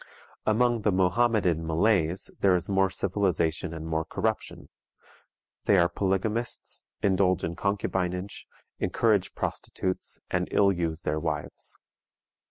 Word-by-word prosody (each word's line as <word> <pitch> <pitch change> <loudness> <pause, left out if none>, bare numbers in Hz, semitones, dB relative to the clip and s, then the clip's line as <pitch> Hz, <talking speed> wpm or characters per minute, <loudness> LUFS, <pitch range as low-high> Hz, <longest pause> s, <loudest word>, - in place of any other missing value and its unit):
Among 120 +1 +3
the 105 - +2
Mohammedan 95 -3 +2
Malays 85 0 +1
there 95 -2 +4
is 90 +3 -2
more 95 0 +3
civilization 90 -4 0
and 80 -1 -6
more 80 0 -1
corruption. - - -3 1.0
They 100 - +5
are 85 -1 +4
polygamists, 105 +4 -1 0.2
indulge 95 -2 +3
in 85 - -2
concubinage, 95 -1 -2 0.3
encourage 105 -5 +1
prostitutes, 95 0 -3
and 90 0 0
ill 100 -1 +4
use 85 -2 -2
their 75 +1 0
wives. 75 -2 -3
95 Hz, 115 wpm, -27 LUFS, 85-100 Hz, 1.0 s, They